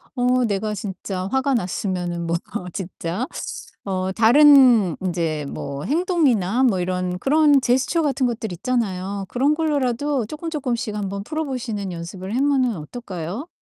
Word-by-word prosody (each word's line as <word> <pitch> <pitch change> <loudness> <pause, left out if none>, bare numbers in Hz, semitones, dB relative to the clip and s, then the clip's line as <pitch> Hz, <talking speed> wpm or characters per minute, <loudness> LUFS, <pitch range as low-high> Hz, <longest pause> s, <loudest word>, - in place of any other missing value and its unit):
어 250 0 +2
내가 210 0 -1
진짜 190 -1 -5
화가 265 0 +1
났으면은 180 -4 -2
뭐 170 - +1 0.4
진짜 185 +3 -4 0.6
어 190 -1 -2
다른 245 - +6
인제 165 -5 -2
뭐 140 0 -5
행동이나 275 - +2
뭐 220 -8 +3
이런 180 0 -2
그런 290 +5 +4
제스처 265 +6 +1
같은 275 -3 +1
것들 230 -3 -3
있잖아요. 200 -2 -2
그런 275 +5 +2
걸로라도 285 -4 0
쪼끔쪼끔씩 265 -7 -3
한번 200 -1 -3
풀어보시는 250 - -3
연습을 180 +4 -6
하면은 265 -3 +2
어떨까요? 185 - -6
225 Hz, 300 characters per minute, -22 LUFS, 185-265 Hz, 0.6 s, 다른